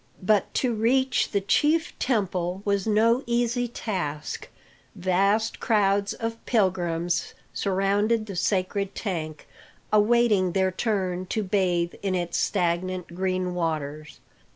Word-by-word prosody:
But 205 +1 +2
to 250 -3 +1
reach 255 +4 +2
the 200 - 0
chief 305 +11 +2
temple 190 -6 -1
was 200 0 0
no 225 +4 +3
easy 240 +1 +1
task. 175 -11 -4 0.5
Vast 195 +4 +1
crowds 200 -3 +2
of 230 0 -5
pilgrims 175 -5 0 0.2
surrounded 205 +3 +1
the 200 -3 -7
sacred 195 +2 -1
tank, 160 -7 -4 0.5
awaiting 210 -4 +3
their 190 -1 +2
turn 185 -3 -1
to 215 +3 -1
bathe 180 -3 0
in 195 -2 -1
its 175 -1 -1
stagnant 180 -1 -1
green 185 0 -1
waters. 155 -3 -3
195 Hz, 115 wpm, -25 LUFS, 180-220 Hz, 0.5 s, no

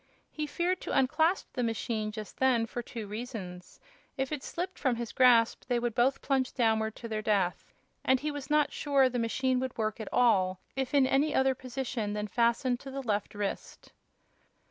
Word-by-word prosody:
He 305 -1 -3
feared 350 +5 -1
to - - -2
unclasp 315 +7 +2
the 250 - -2
machine 225 -2 -2
just 215 0 -8
then, 255 -3 +3
for 240 +2 -5
two 230 -2 -7
reasons: 205 -5 -7 0.4
if 270 +1 -2
it 295 -3 -3
slipped 365 +2 -5
from 260 -4 +1
his 235 -1 -5
grasp 240 -3 +4
they 245 - +1
would 240 -1 -1
both 250 +4 +2
plunge 265 -2 0
downward 220 -3 +1
to 235 - -7
their 215 -1 -2
death; 200 -5 0 0.3
and 260 0 +3
he 300 +2 -2
was 290 -1 -7
not 300 -1 +3
sure 275 -3 +3
the 245 -1 -2
machine 255 +3 +1
would 260 0 -4
work 215 0 -1
at 220 - -6
all 190 -7 +3 0.2
if 265 +1 -2
in 275 -2 +6
any 280 +3 +2
other 265 0 +3
position 250 -4 -4
than 210 0 -2
fastened 240 +2 +1
to 275 - -9
the 270 0 -5
left 210 -3 -2
wrist. 205 -1 -5
245 Hz, 190 wpm, -30 LUFS, 220-270 Hz, 0.4 s, in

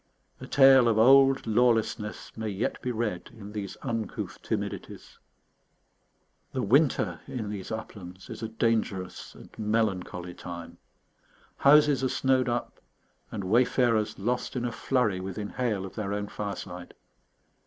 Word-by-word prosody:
A - - -9
tale 135 -3 +7
of 115 -2 +2
old 135 +3 +6
lawlessness 110 -2 0
may 110 -1 -3
yet 100 +3 -2
be 125 - -2
read 110 -6 -3
in 105 -1 -9
these 105 -3 -5
uncouth 115 -5 -4
timidities. - - -5 1.3
The 130 - -1
winter 105 - +2
in 110 -5 -4
these 100 -3 -6
uplands 95 -4 -8
is - - -8
a 110 - -2
dangerous 110 -5 -2
and - - -14
melancholy 100 -5 -1
time. 85 -1 -9 0.8
Houses 145 -1 +5
are 130 - +2
snowed 130 -1 +2
up, 120 0 -3 0.5
and 100 - -5
wayfarers 115 +1 +2
lost 125 +6 -2
in 120 -1 -1
a 120 - -1
flurry 115 -5 0
within 95 +2 -5
hail 110 -7 -2
of 95 - -9
their 100 -2 -3
own 105 0 -3
fireside. 90 -3 -6
110 Hz, 135 wpm, -28 LUFS, 100-125 Hz, 1.3 s, tale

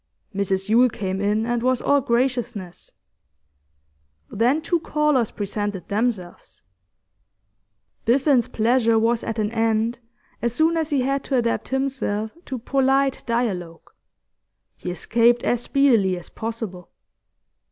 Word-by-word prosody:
Mrs 195 -1 -1
Yule 240 +4 +5
came 190 -3 -4
in, 210 +2 +1
and 240 0 -1
was 255 0 +1
all 285 0 +2
graciousness. 240 -7 -2 1.4
Then 245 +8 +2
two 335 +2 0
callers 300 -7 +1
presented 205 -2 -4
themselves. 205 -5 -3 1.4
Biffen's 260 0 +3
pleasure 230 0 +2
was 230 +1 +1
at 225 - -4
an 215 0 -1
end 225 +1 0 0.4
as 235 -1 -1
soon 320 +3 +3
as 320 -2 -1
he 285 -4 +1
had 275 +1 -1
to 275 - -1
adapt 235 -1 0
himself 260 -6 -2
to 260 - -4
polite 270 +2 +1
dialogue; 185 -9 -2 0.8
he - - -6
escaped 235 +6 +2
as 240 - +1
speedily 235 -9 +3
as 175 - -11
possible. 220 -6 -6
235 Hz, 120 wpm, -23 LUFS, 210-260 Hz, 1.4 s, Yule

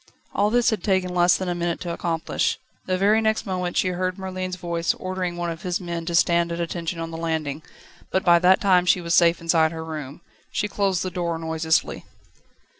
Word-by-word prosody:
All 205 - +2
this 240 +1 +3
had 220 - -2
taken 185 -2 +1
less 175 0 +4
than 185 - -4
a 175 - 0
minute 170 -1 -2
to 170 -1 -3
accomplish. 165 -1 -1 0.3
The 185 0 +1
very 210 +4 +3
next 220 +1 0
moment 180 -2 -2
she 185 - +2
heard 185 +1 -2
Merlin's 185 -1 -4
voice 170 -2 -1
ordering 185 -2 -4
one 175 -1 -2
of 165 0 -8
his 180 -1 -2
men 170 -2 -5
to 170 - -1
stand 170 0 +3
at 170 - -3
attention 170 0 -3
on 165 0 -4
the 165 - -6
landing, 160 -3 -2 0.5
but 190 - 0
by 170 -1 +6
that 185 +2 +5
time 180 -3 +4
she 180 - +4
was 170 -1 -2
safe 170 0 +5
inside 165 -1 +2
her 160 -1 -6
room. 150 -2 -7 0.3
She 210 - -1
closed 195 -3 0
the 185 - -3
door 170 -2 -2
noiselessly. 160 0 0
175 Hz, 210 wpm, -23 LUFS, 165-185 Hz, 0.5 s, by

